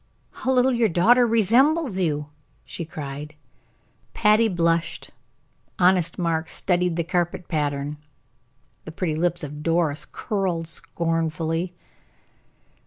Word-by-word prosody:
"How 260 Hz, -, -2 dB
little 255 Hz, 0 st, +4 dB
your 235 Hz, -2 st, +2 dB
daughter 235 Hz, +8 st, +4 dB
resembles 235 Hz, -, +3 dB
you!" 150 Hz, -4 st, -1 dB, 0.4 s
she 170 Hz, -, -6 dB
cried. 150 Hz, -1 st, -7 dB, 0.8 s
Patty 215 Hz, +2 st, +4 dB
blushed, 170 Hz, -3 st, -1 dB, 0.7 s
honest 180 Hz, -2 st, +3 dB
Mark 165 Hz, -2 st, -1 dB
studied 180 Hz, -2 st, +1 dB
the 170 Hz, -, 0 dB
carpet 175 Hz, +1 st, -2 dB
pattern, 145 Hz, -2 st, -2 dB, 0.9 s
the 160 Hz, -, -7 dB
pretty 165 Hz, -1 st, -2 dB
lips 175 Hz, +1 st, 0 dB
of 150 Hz, 0 st, -7 dB
Doris 165 Hz, -2 st, 0 dB
curled 185 Hz, -6 st, -3 dB
scornfully. 165 Hz, +1 st, -2 dB
170 Hz, 105 wpm, -23 LUFS, 160-190 Hz, 0.9 s, little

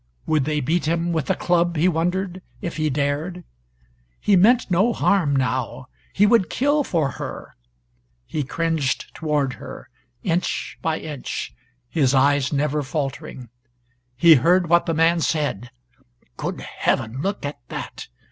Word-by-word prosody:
Would 155 Hz, -4 st, +1 dB
they 150 Hz, 0 st, 0 dB
beat 160 Hz, +4 st, 0 dB
him 170 Hz, +1 st, 0 dB
with 155 Hz, -5 st, -2 dB
a -, -, +3 dB
club, 175 Hz, -1 st, +1 dB
he 165 Hz, +3 st, +3 dB
wondered, 180 Hz, +2 st, -1 dB, 0.2 s
if 170 Hz, -, -5 dB
he 155 Hz, -1 st, +1 dB
dared! 150 Hz, +6 st, -2 dB, 0.8 s
He 205 Hz, -, +3 dB
meant 220 Hz, +4 st, +4 dB
no 200 Hz, +7 st, +3 dB
harm 170 Hz, -11 st, +2 dB
now. 130 Hz, 0 st, -2 dB, 0.2 s
He 205 Hz, -, +3 dB
would 210 Hz, -4 st, +4 dB
kill 290 Hz, +3 st, +2 dB
for 155 Hz, -, 0 dB
her. -, -, -7 dB, 0.7 s
He 150 Hz, -, -2 dB
cringed 160 Hz, -1 st, -1 dB
toward 150 Hz, -4 st, -1 dB
her, -, -, -10 dB, 0.3 s
inch 175 Hz, 0 st, -1 dB
by 160 Hz, -1 st, 0 dB
inch, 150 Hz, -4 st, -5 dB, 0.3 s
his 140 Hz, -4 st, +2 dB
eyes 140 Hz, 0 st, +3 dB
never 150 Hz, +1 st, 0 dB
faltering. 135 Hz, -3 st, -5 dB, 0.7 s
He 170 Hz, +4 st, +8 dB
heard 170 Hz, +5 st, +3 dB
what 170 Hz, 0 st, +4 dB
the 165 Hz, -, 0 dB
man 165 Hz, +2 st, +3 dB
said 145 Hz, -8 st, -1 dB, 0.7 s
"Good -, -, -4 dB
heaven! 120 Hz, +4 st, -1 dB
Look 195 Hz, -2 st, -2 dB
at 145 Hz, -2 st, -5 dB
that!" -, -, -7 dB
160 Hz, 145 wpm, -22 LUFS, 140-175 Hz, 0.8 s, He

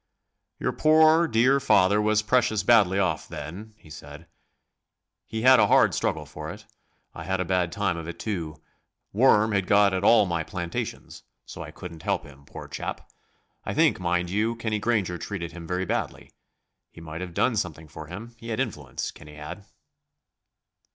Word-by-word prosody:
"Your -, -, -1 dB
poor, 160 Hz, +2 st, +5 dB
dear 130 Hz, +2 st, +3 dB
father 105 Hz, -6 st, +3 dB
was 110 Hz, 0 st, +2 dB
precious 110 Hz, -2 st, +2 dB
badly 100 Hz, -4 st, +4 dB
off 90 Hz, -6 st, 0 dB
then," 95 Hz, +9 st, -8 dB
he 80 Hz, -, -18 dB
said; 75 Hz, +2 st, -11 dB, 1.0 s
"he 110 Hz, 0 st, -4 dB
had 130 Hz, 0 st, +7 dB
a -, -, +5 dB
hard -, -, +4 dB
struggle -, -, -1 dB
for -, -, -8 dB
it. -, -, -10 dB, 0.5 s
I 80 Hz, -, -8 dB
had 95 Hz, +2 st, -2 dB
a 90 Hz, -, -1 dB
bad 90 Hz, -1 st, 0 dB
time 100 Hz, -2 st, -1 dB
of 85 Hz, -1 st, -7 dB
it 85 Hz, -, -7 dB
too; 85 Hz, -8 st, -4 dB, 0.5 s
worm 110 Hz, -1 st, +4 dB
had 100 Hz, -3 st, 0 dB
got 100 Hz, -1 st, +4 dB
at 95 Hz, +1 st, -1 dB
all 110 Hz, 0 st, +6 dB
my 85 Hz, -3 st, -1 dB
plantations, 85 Hz, +1 st, -5 dB, 0.2 s
so -, -, -9 dB
I -, -, -7 dB
couldn't 85 Hz, -3 st, -10 dB
help 100 Hz, +2 st, -1 dB
him, 70 Hz, -2 st, -15 dB
poor -, -, -10 dB
chap. -, -, -6 dB, 0.5 s
I -, -, -4 dB
think, -, -, +3 dB
mind 90 Hz, 0 st, -1 dB
you, 110 Hz, +4 st, 0 dB
Kenny 110 Hz, -2 st, -2 dB
Granger 100 Hz, -6 st, 0 dB
treated 85 Hz, -5 st, -5 dB
him 85 Hz, -1 st, -10 dB
very 90 Hz, +2 st, -2 dB
badly. -, -, -4 dB, 0.6 s
He -, -, -15 dB
might 80 Hz, +1 st, -8 dB
have 90 Hz, -2 st, -7 dB
done 130 Hz, -3 st, +2 dB
something 80 Hz, -6 st, -3 dB
for 75 Hz, +1 st, -10 dB
him 105 Hz, +8 st, -9 dB
he 115 Hz, -, -9 dB
had 110 Hz, -, -2 dB
influence, 75 Hz, -, -4 dB
Kenny 75 Hz, 0 st, -14 dB
had." 75 Hz, +7 st, -9 dB
95 Hz, 180 wpm, -25 LUFS, 85-110 Hz, 1.0 s, had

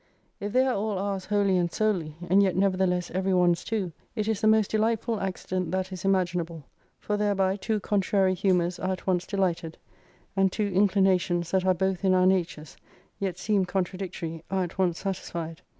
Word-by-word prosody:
If 205 Hz, +1 st, -4 dB
they 255 Hz, +3 st, +3 dB
are 260 Hz, -, +1 dB
all 210 Hz, -1 st, -1 dB
ours 195 Hz, -1 st, -2 dB
wholly 200 Hz, -2 st, +2 dB
and 170 Hz, -1 st, 0 dB
solely, 180 Hz, -9 st, -1 dB
and 190 Hz, +3 st, +5 dB
yet 190 Hz, -3 st, +2 dB
nevertheless 185 Hz, -2 st, +1 dB
every 190 Hz, +1 st, 0 dB
one's 175 Hz, -1 st, +3 dB
too, 205 Hz, -6 st, -2 dB, 0.2 s
it 215 Hz, -2 st, -1 dB
is 220 Hz, -3 st, -1 dB
the 215 Hz, -, +3 dB
most 215 Hz, -2 st, +4 dB
delight 220 Hz, +1 st, +1 dB
ful 230 Hz, -3 st, -2 dB
accident 185 Hz, -2 st, -3 dB
that 190 Hz, 0 st, -1 dB
is 185 Hz, -2 st, -7 dB
imaginable, 175 Hz, -4 st, 0 dB, 0.3 s
for 210 Hz, -, -2 dB
thereby 195 Hz, -2 st, +1 dB
two 210 Hz, +2 st, -1 dB
contrary 195 Hz, -1 st, +1 dB
humours 180 Hz, -1 st, +1 dB
are 185 Hz, 0 st, -1 dB
at 185 Hz, -, -8 dB
once 180 Hz, -1 st, 0 dB
dehghted, 175 Hz, -5 st, -1 dB, 0.6 s
and 195 Hz, -1 st, +3 dB
two 210 Hz, -, -1 dB
inclinations, 185 Hz, -3 st, +2 dB
that 190 Hz, -1 st, +1 dB
are 185 Hz, -, +4 dB
both 190 Hz, 0 st, -1 dB
in 190 Hz, -1 st, +4 dB
our 185 Hz, 0 st, +4 dB
natures, 175 Hz, -5 st, 0 dB, 0.4 s
yet 190 Hz, -3 st, -2 dB
seem 200 Hz, 0 st, +1 dB
contradictory, 180 Hz, -3 st, -4 dB
are 190 Hz, 0 st, 0 dB
at 175 Hz, +2 st, -7 dB
once 175 Hz, -3 st, +2 dB
satisfied. 170 Hz, -3 st, -5 dB
190 Hz, 185 wpm, -27 LUFS, 180-200 Hz, 0.6 s, and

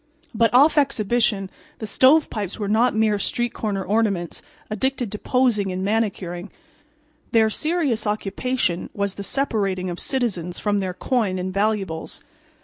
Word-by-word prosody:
But 230 Hz, 0 st, +3 dB
off 290 Hz, +5 st, +6 dB
exhibition 220 Hz, -6 st, +1 dB, 0.3 s
the 220 Hz, -, -5 dB
"Stovepipes" 220 Hz, -, +3 dB
were 205 Hz, -, -3 dB
not 220 Hz, +3 st, +2 dB
mere 215 Hz, -2 st, +2 dB
street 240 Hz, +2 st, -1 dB
corner 200 Hz, -3 st, -2 dB
ornaments 200 Hz, -4 st, 0 dB, 0.3 s
addicted 245 Hz, +1 st, -2 dB
to 210 Hz, -, -5 dB
posing 235 Hz, -7 st, +1 dB
and 185 Hz, +1 st, -3 dB
manicuring. 200 Hz, -4 st, -2 dB, 0.8 s
Their 220 Hz, -1 st, +4 dB
serious 300 Hz, -8 st, 0 dB
occupation 210 Hz, -1 st, -1 dB
was 200 Hz, -1 st, -1 dB
the 200 Hz, -, -7 dB
separating 200 Hz, -7 st, -1 dB
of 175 Hz, -, -6 dB
citizens 195 Hz, -10 st, -1 dB
from 205 Hz, -1 st, 0 dB
their 185 Hz, -2 st, -3 dB
coin 220 Hz, -8 st, 0 dB
and 185 Hz, +1 st, -3 dB
valuables. 195 Hz, -5 st, -2 dB
210 Hz, 140 wpm, -22 LUFS, 195-240 Hz, 0.8 s, off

